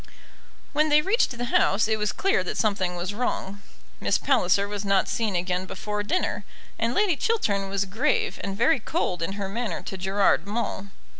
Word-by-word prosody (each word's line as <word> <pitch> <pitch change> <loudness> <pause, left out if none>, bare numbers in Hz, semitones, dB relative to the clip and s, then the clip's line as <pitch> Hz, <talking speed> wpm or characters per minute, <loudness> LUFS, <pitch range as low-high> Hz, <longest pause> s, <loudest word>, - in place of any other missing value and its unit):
When 305 +2 +3
they 300 0 +5
reached 390 - +1
the 245 - -2
house 205 +2 +3
it 220 -1 0
was 210 0 0
clear 390 - +1
that 180 - -4
something 195 -4 0
was 175 +3 -3
wrong. 205 -3 -3 0.4
Miss - - +2
Palliser 200 -7 +2
was 205 0 -4
not 195 -1 +2
seen 220 -4 -1
again 180 +1 -1
before 210 +2 -3
dinner, 285 - -1 0.4
and 230 +2 0
Lady 405 -5 +3
Chiltern 205 - 0
was 200 0 0
grave 300 - 0
and 195 0 -3
very 275 +6 +3
cold 215 - -2
in 165 +4 -2
her 200 -1 -4
manner 200 -3 -3
to 190 - -6
Gerard 195 +2 +2
Maule. 205 -2 -3
205 Hz, 180 wpm, -25 LUFS, 195-245 Hz, 0.4 s, they